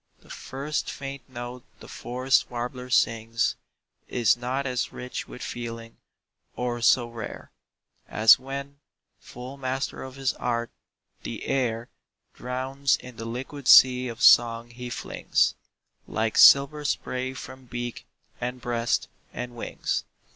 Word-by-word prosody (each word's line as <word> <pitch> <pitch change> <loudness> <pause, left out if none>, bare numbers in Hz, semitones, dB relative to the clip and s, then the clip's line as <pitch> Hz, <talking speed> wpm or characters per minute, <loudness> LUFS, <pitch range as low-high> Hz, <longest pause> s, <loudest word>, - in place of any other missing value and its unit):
The - - -16
first 140 +3 -4
faint 135 -1 -7
note 120 0 -7 0.2
the - - -12
forest 130 +2 0
warbler 125 +1 -5
sings 115 -1 +1 0.5
Is 120 -3 +3
not 125 +3 -2
as 125 -2 -1
rich 125 0 -6
with - - -9
feeling, 115 -1 -6 0.6
or 120 -1 -2
so 120 +1 +4
rare 115 -2 -8 0.6
As 110 +2 +6
when, 140 +2 -7 0.4
full 125 +3 -10
master 130 0 -3
of 130 -1 -8
his 135 -1 0
art, 120 -1 -2 0.5
the - - -6
air 120 -3 0 0.5
Drowns 130 +2 -1
in 125 -2 -12
the 115 - -6
liquid 130 +4 -6
sea 125 -1 +8
of 120 0 -6
song 115 0 +6
he 125 +1 -7
flings - - 0 0.5
Like 110 0 -1
silver 140 +2 +7
spray 130 -2 -2
from 130 0 -10
beak, 120 -1 -6 0.3
and 125 +1 -3
breast, 120 -1 0 0.2
and 125 0 -6
wings. 115 - -3
125 Hz, 130 wpm, -26 LUFS, 120-130 Hz, 0.6 s, sea